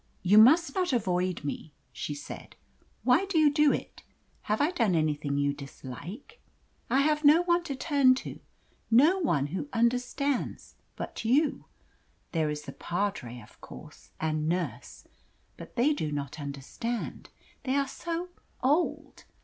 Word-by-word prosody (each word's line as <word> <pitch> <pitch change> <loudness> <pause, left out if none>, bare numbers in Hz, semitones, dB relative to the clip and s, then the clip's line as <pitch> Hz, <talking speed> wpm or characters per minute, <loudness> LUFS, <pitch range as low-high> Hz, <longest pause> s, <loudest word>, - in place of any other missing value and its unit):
"You 200 +4 +6
must 275 +6 +6
not 365 -6 0
avoid 185 -7 0
me," 145 +1 -6 0.2
she 145 - -4
said. 145 - -9 0.5
"Why 260 +10 +4
do 385 -4 -1
you 300 -2 +5
do 300 -1 +5
it? - - -5 0.5
Have 215 - +1
I 295 +4 +2
done 230 - +1
anything 150 -3 0
you 140 0 +1
dislike? 150 - -10 0.5
I 265 +3 +3
have 300 +1 +1
no 305 +4 +6
one 345 0 +2
to 290 - -3
speak 275 -2 +4
to, - - -7 0.5
no 295 +12 +5
one 145 - +1
who 285 +10 -3
understands, 250 +3 -1 0.2
but - - -6
you. 275 +6 +2 0.7
There 160 -3 0
is 150 0 -4
the 140 - -7
padre, 170 - -3
of 105 - -19
course - - -13
and 155 0 -1
nurse; 175 0 -4 0.5
but - - -12
they 265 +6 +3
do 155 - -3
not 145 +1 -4
understand. 145 - -5 0.3
They 265 0 -1
are 280 -1 +1
so 340 +5 -4 0.3
OLD! 295 +7 0
235 Hz, 150 wpm, -28 LUFS, -, 0.7 s, You